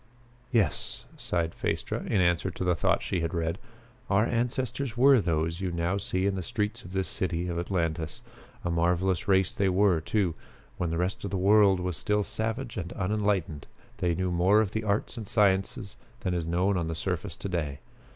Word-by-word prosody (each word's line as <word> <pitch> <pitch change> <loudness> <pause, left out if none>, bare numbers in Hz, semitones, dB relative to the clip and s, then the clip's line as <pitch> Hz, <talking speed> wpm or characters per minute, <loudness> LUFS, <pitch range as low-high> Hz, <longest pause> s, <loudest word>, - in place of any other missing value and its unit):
"Yes," 105 - 0
sighed 85 -2 -1
Phaestra, - - -2
in 100 - +2
answer 85 -2 +2
to - - -5
the 90 -1 +3
thought 85 - +1
she 95 - -1
had 85 +1 -2
read, 85 +2 -1 0.5
"our 105 +2 +4
ancestors 120 +1 -1
were 135 -1 +6
those 85 0 -1
you 95 -2 -1
now 85 +3 0
see 95 -1 -1
in 100 - +2
the 95 - -2
streets 105 +4 -2
of 90 - -11
this 95 0 -1
city 90 -1 -2
of 85 -1 -2
Atlantis. 85 -3 -2 0.4
A 85 - 0
marvelous 90 +1 +1
race 95 -2 +3
they 100 -1 +1
were, 95 -3 +3
too. 85 +1 0 0.5
When 90 - 0
the 80 - -1
rest 90 +3 -1
of 100 - -3
the 95 - -2
world 100 0 +5
was 90 -3 -2
still 105 +4 +1
savage 115 +4 -3
and 90 -2 -4
unenlightened, 100 -6 -1 0.3
they 85 -2 +1
knew 95 0 -1
more 90 +5 +4
of 105 -3 +1
the 110 - -2
arts 105 +4 -1
and 110 -3 -5
sciences 95 -2 +1 0.2
than 90 - -1
is 85 -2 -2
known 90 +3 +1
on 85 -2 -1
the 80 - -3
surface - - -3
to - - -5
day. 75 -7 -2
95 Hz, 195 wpm, -28 LUFS, 85-105 Hz, 0.5 s, were